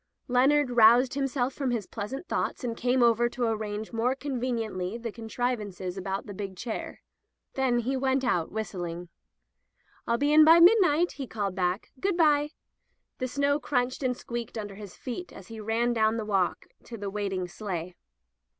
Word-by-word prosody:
Leonard 260 +2 +3
roused 240 +3 +6 0.4
from 275 -2 -2
his 230 -5 -1
pleasant 240 - -6
thoughts, - - -2
and 235 -2 -2
came 250 +1 +2
over 235 0 +4
to 245 +1 -4
arrange 215 0 -3
more 240 +3 +1
conveniently 235 -8 -3
the 230 -1 -5
contrivances 215 -5 -3
about 195 0 -4
the 205 - -7
big 195 -1 -6
chair. 230 +3 -5 0.5
Then 260 -2 +1
he 260 +4 -1
went 265 0 +1
out 175 -10 0
whistling. 175 -5 -5 1.0
"rU 235 - +2
be 290 +3 +2
in 310 0 +8
by 325 +2 +8
midnight,'' 350 -3 +5
he 270 -3 -6
called 205 -4 -3
back. 180 +1 -1
"Good 385 +1 0
by!'* 295 -3 +4 0.7
The 255 - -1
snow 280 +3 +1
crunched 250 -2 -1
and 250 -2 0
squeaked 235 -1 -6
under 205 -2 -5
his 200 -2 -10
feet 270 +8 -6
as 190 - -12
he 225 -1 -8
ran 225 +3 0
down 220 0 +2
the 220 - -3
walk 195 -4 0 0.2
to 235 - -8
the 200 -1 -5
waiting 195 -3 -2
sleigh. 180 -2 -5
235 Hz, 170 wpm, -28 LUFS, 205-260 Hz, 1.0 s, in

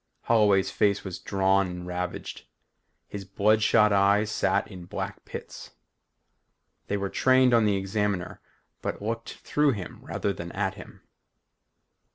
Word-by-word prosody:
Holloway's 105 -4 +3
face 100 -1 +1
was 95 -3 -6
drawn 95 0 +2
and 90 0 -7
ravaged. 90 0 -5 0.6
His 100 -1 -7
bloodshot 105 +2 +3
eyes 100 +2 +3
sat - - +1
in 90 -2 -10
black - - -6
pits. - - -9 1.1
They 100 - -1
were 100 0 -2
trained 130 +4 +4
on 115 -2 +5
the 100 -2 +2
Examiner 95 -2 -2 0.4
but - - -3
looked 115 +2 -4
through 150 -2 +2
him 95 -5 -7
rather 100 - -2
than 85 -2 -7
at - - -1
him. - - -13
100 Hz, 135 wpm, -27 LUFS, 95-105 Hz, 1.1 s, on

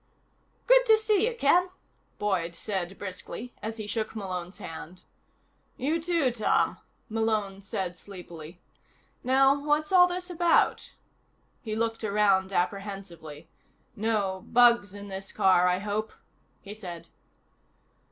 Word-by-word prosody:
"Good - - +6
to 440 -1 +7
see 435 -1 +2
you, 480 - -7
Ken," 360 -1 +3 0.5
Boyd 175 -5 -1
said 190 -2 -4
briskly, 200 +5 -7
as 220 +1 -5
he 215 - -5
shook 220 +1 -3
Malone's 185 -3 -5
hand. 175 -2 -9 0.7
"You, 310 +5 0
too, 330 -6 +1
Tom," 225 -3 +1 0.3
Malone 215 -4 -1
said 190 -2 -4
sleepily. 175 -4 -11 0.6
"Now 270 +2 +4
what's 300 +2 +1
all 360 -1 +7
this 360 +1 -4
about?" 345 -1 +2 0.7
He 215 -3 -4
looked 225 0 -2
around 200 -2 +2
apprehensively. 185 -5 -4 0.5
"No 205 -3 -1
bugs 235 -5 +4
in 205 0 -8
this 195 0 -7
car, 185 -1 +4
I 180 0 +2
hope?" 210 +2 -3 0.5
he 200 - -8
said. 180 -6 -9
210 Hz, 125 wpm, -28 LUFS, 190-260 Hz, 0.7 s, to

